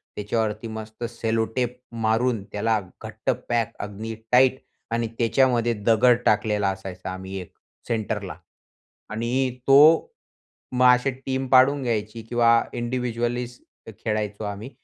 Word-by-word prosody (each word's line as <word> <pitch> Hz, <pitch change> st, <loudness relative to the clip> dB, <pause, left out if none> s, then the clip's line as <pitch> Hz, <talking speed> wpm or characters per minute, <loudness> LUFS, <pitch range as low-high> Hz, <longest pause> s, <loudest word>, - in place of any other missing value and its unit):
त्याच्यावरती 110 Hz, +1 st, -2 dB
मस्त 110 Hz, +1 st, -8 dB
सेलोटेप 115 Hz, +2 st, -1 dB, 0.3 s
मारून 110 Hz, -1 st, +1 dB
त्याला 110 Hz, +1 st, +1 dB, 0.2 s
घट्ट 110 Hz, 0 st, -5 dB, 0.2 s
पॅक 115 Hz, -2 st, 0 dB
अगदी 105 Hz, +2 st, -6 dB, 0.2 s
टाईट 130 Hz, +1 st, +5 dB, 0.3 s
आणि 115 Hz, 0 st, 0 dB
त्याच्यामध्ये 120 Hz, -1 st, +2 dB
दगड 120 Hz, +1 st, +5 dB
टाकलेला 105 Hz, -2 st, +2 dB
असायचा 95 Hz, -1 st, -6 dB
आम्ही 95 Hz, +1 st, -7 dB
एक 90 Hz, -, -13 dB, 0.3 s
सेंटरला. 110 Hz, -4 st, -3 dB, 0.7 s
आणि 120 Hz, +4 st, 0 dB, 0.2 s
तो 150 Hz, -, +7 dB, 0.7 s
मग 125 Hz, 0 st, +3 dB
अशी 125 Hz, +2 st, +1 dB
टीम 130 Hz, 0 st, -4 dB
पाडून 135 Hz, +2 st, +5 dB
घ्यायची 110 Hz, -1 st, -2 dB
किंवा 115 Hz, -1 st, +4 dB
इंडिव्हिज्युअलीच 120 Hz, 0 st, -2 dB, 0.3 s
ते -, -, -7 dB
खेळायचो 105 Hz, -1 st, -2 dB
आम्ही. 105 Hz, +5 st, -6 dB
115 Hz, 115 wpm, -24 LUFS, 110-125 Hz, 0.7 s, तो